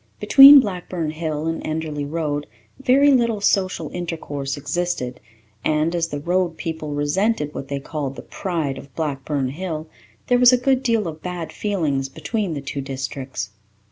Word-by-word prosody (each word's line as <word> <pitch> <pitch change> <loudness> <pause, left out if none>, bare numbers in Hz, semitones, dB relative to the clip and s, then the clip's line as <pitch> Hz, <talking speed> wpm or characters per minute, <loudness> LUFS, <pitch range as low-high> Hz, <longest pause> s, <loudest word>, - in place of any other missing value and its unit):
Between 275 +1 +10
Blackburn 180 - -3
Hill 155 -1 -3
and 165 0 -2
Enderly 155 -2 -3
Road 150 -3 -2 0.3
very 270 +2 +5
little 235 -5 +2
social 195 -2 0
intercourse 150 -6 -4
existed 145 -4 -2 0.4
and, 155 +2 +1
as 170 -1 0
the 145 -2 -5
Road 175 +1 0
people 155 -3 -4
resented 150 +2 0
what 135 - -6
they 140 0 -3
called 140 -1 -4
the - - -9
pride 155 -8 -3
of 140 - -15
Blackburn 140 -3 -2
Hill, 160 +1 -5 0.4
there 245 0 +3
was 250 0 +8
a 250 - +5
good 260 +1 +2
deal 230 -6 +1
of 160 -1 -7
bad 180 -2 -5
feeling 165 -10 -1
between 180 +2 -2
the 140 - -4
two 140 0 -4
districts. 135 -5 -5
160 Hz, 160 wpm, -22 LUFS, 145-185 Hz, 0.4 s, Between